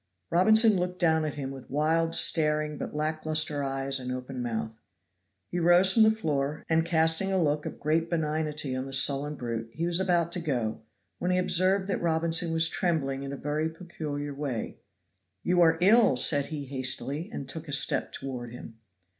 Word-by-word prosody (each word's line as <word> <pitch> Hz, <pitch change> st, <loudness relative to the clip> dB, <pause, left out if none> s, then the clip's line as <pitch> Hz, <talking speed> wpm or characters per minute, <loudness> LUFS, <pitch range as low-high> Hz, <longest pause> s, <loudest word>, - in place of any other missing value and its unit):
Robinson 220 Hz, +4 st, +5 dB
looked 180 Hz, 0 st, -3 dB
down 160 Hz, -3 st, +2 dB
at 150 Hz, -, -4 dB
him 135 Hz, -2 st, -5 dB
with 135 Hz, -2 st, -11 dB
wild, 165 Hz, +3 st, +1 dB
staring 150 Hz, -1 st, +3 dB
but -, -, -6 dB
lack 155 Hz, +1 st, -2 dB
luster 155 Hz, -2 st, +1 dB
eyes 135 Hz, 0 st, -1 dB
and 125 Hz, 0 st, -5 dB
open 125 Hz, 0 st, -6 dB
mouth. 115 Hz, -2 st, -3 dB, 0.8 s
He 175 Hz, -, -2 dB
rose 175 Hz, +3 st, +5 dB
from 225 Hz, -, +4 dB
the 220 Hz, -, +7 dB
floor, 150 Hz, -9 st, -2 dB
and 160 Hz, 0 st, +2 dB
casting 165 Hz, +3 st, +2 dB
a 190 Hz, -, +1 dB
look 150 Hz, -2 st, 0 dB
of -, -, -8 dB
great 160 Hz, +2 st, 0 dB
benignity 155 Hz, -4 st, -2 dB
on 130 Hz, +1 st, -4 dB
the 135 Hz, -, -8 dB
sullen 140 Hz, +2 st, +3 dB
brute, 115 Hz, -3 st, -5 dB
he 165 Hz, -, -3 dB
was 175 Hz, +1 st, 0 dB
about 175 Hz, -3 st, +1 dB
to 180 Hz, -, 0 dB
go, 125 Hz, -9 st, -3 dB, 0.4 s
when 180 Hz, -, -2 dB
he 180 Hz, -, +2 dB
observed 185 Hz, +2 st, +2 dB
that 195 Hz, -, -2 dB
Robinson 165 Hz, 0 st, +1 dB
was 165 Hz, 0 st, +3 dB
trembling 150 Hz, -6 st, -1 dB
in 140 Hz, 0 st, -6 dB
a 140 Hz, -, -6 dB
very 150 Hz, +3 st, -2 dB
peculiar 155 Hz, -4 st, -6 dB
way. 135 Hz, -5 st, -5 dB, 0.6 s
"You 180 Hz, 0 st, +2 dB
are 165 Hz, -1 st, +4 dB
ill," 210 Hz, -, +5 dB
said 140 Hz, +3 st, +2 dB
he 150 Hz, -3 st, -6 dB
hastily, 135 Hz, +5 st, -3 dB
and 140 Hz, -, -6 dB
took 160 Hz, +4 st, -8 dB
a -, -, -7 dB
step 140 Hz, -, 0 dB
toward 125 Hz, -3 st, -7 dB
him. 115 Hz, -2 st, -11 dB
155 Hz, 190 wpm, -27 LUFS, 135-170 Hz, 0.8 s, the